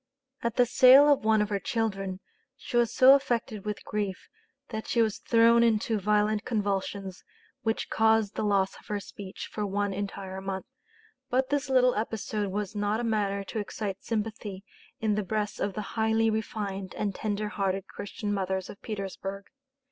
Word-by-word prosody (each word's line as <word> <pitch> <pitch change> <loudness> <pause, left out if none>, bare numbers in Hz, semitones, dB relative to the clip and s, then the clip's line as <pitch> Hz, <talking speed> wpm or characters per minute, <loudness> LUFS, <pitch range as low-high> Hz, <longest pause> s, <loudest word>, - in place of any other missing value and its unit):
At 235 0 -1
the 245 - +5
sale 265 +4 +8
of 275 - -3
one 220 -1 +4
of 210 - -4
her 200 -1 0
children 195 -3 -2 0.4
she - - -7
was 240 -2 +3
so 260 +1 +8
affected 240 -6 0
with 210 -1 -4
grief 205 -3 -3 0.4
that 220 -2 -5
she 235 - 0
was 220 -3 +2
thrown 230 0 +5
into 225 -1 +2
violent 210 +1 +2
convulsions, 200 -3 -2 0.4
which 225 0 -2
caused 220 -2 +3
the - - -3
loss 195 -2 +2
of - - -20
her 210 -1 -2
speech 195 0 -8
for 210 - -3
one 205 0 -1
entire 190 -1 -5
month. 190 -1 -4 0.6
But 260 +1 +1
this 285 -1 0
little 255 -1 +4
episode 215 -1 -2
was 205 +1 -3
not 205 +1 0
a - - -2
matter 205 -3 0
to 205 +3 -4
excite 200 -1 -4
sympathy 210 -3 -4 0.4
in 220 -1 +1
the 210 - 0
breasts 210 +1 -2
of 200 -1 -2
the 215 - -2
highly 220 0 +2
refined 200 -3 -4
and 205 -2 -1
tender 210 +1 -2
hearted 195 -2 -1
Christian 205 +1 -5
mothers 190 -1 -2
of 200 - -15
Petersburg. 195 -2 -5
210 Hz, 170 wpm, -28 LUFS, 195-225 Hz, 0.6 s, sale